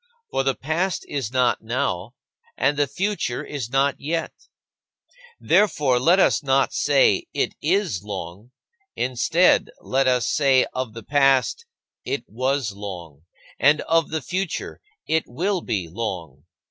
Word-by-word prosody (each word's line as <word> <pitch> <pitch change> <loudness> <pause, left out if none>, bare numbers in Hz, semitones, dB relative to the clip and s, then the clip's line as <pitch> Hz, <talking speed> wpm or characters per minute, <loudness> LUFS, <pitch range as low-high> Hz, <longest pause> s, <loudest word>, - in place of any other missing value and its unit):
For - - +1
the 135 0 +1
past 170 +6 -2
is 135 -6 -3
not 125 -1 +2
now, 115 -3 -2 0.4
and 140 +2 +2
the 145 0 +1
future 195 -11 -2
is 135 -6 -5
not 135 +2 +1
yet. 165 +3 -2 1.1
Therefore, 150 -9 +3
let 170 +8 +4
us - - +3
not 135 -1 +2
say, 145 -2 +3
"It - - 0
is 175 - 0
long"; 100 +1 -7 0.5
instead, 155 +8 +2
let 135 0 0
us 125 -2 +2
say 135 -3 +3
of 130 -4 -4
the 115 - -8
past, 135 - +2 0.4
"It 140 - -3
was 130 +1 -1
long," 90 -7 -9 0.3
and 145 +4 +4
of 165 0 +1
the 160 -3 -3
future, 185 +3 -4 0.2
"It 160 0 +1
will 180 +9 -1
be 100 - -2
long." 85 - -6
135 Hz, 135 wpm, -23 LUFS, 115-155 Hz, 1.1 s, let